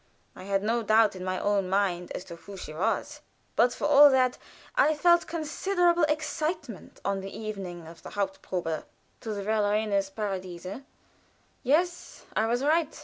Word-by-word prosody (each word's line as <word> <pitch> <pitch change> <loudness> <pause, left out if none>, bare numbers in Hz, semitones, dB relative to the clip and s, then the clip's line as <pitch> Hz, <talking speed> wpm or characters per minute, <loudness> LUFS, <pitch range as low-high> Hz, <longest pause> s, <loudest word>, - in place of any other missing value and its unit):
I 185 - -10
had 195 0 0
no 230 +2 +1
doubt 215 -1 +4
in 185 - -7
my 185 0 -1
own 200 -2 +1
mind 185 -3 0
as - - -5
to 180 -3 -9
who 195 +4 -11
she 155 - -7
was, 225 - -1 0.3
but 245 +1 +4
for - - -4
all 295 0 +8
that 255 -2 +2 0.4
I 310 -11 +4
felt 345 +3 +4
considerable 345 +2 +1
excitement 305 - -3
on 200 0 0
the 195 - -6
evening 195 -6 -6
of 165 +1 -12
the - - -9
haupt 195 -2 -3
probe 165 -4 -3 0.4
to 220 - -4
the 200 - -4
"Verlorenes 210 -1 +1
Paradies." 190 -4 -5 1.0
Yes, 345 +7 0
I 220 - +2
was 240 +3 0
right. 315 +1 +1
215 Hz, 165 wpm, -28 LUFS, 195-295 Hz, 1.0 s, all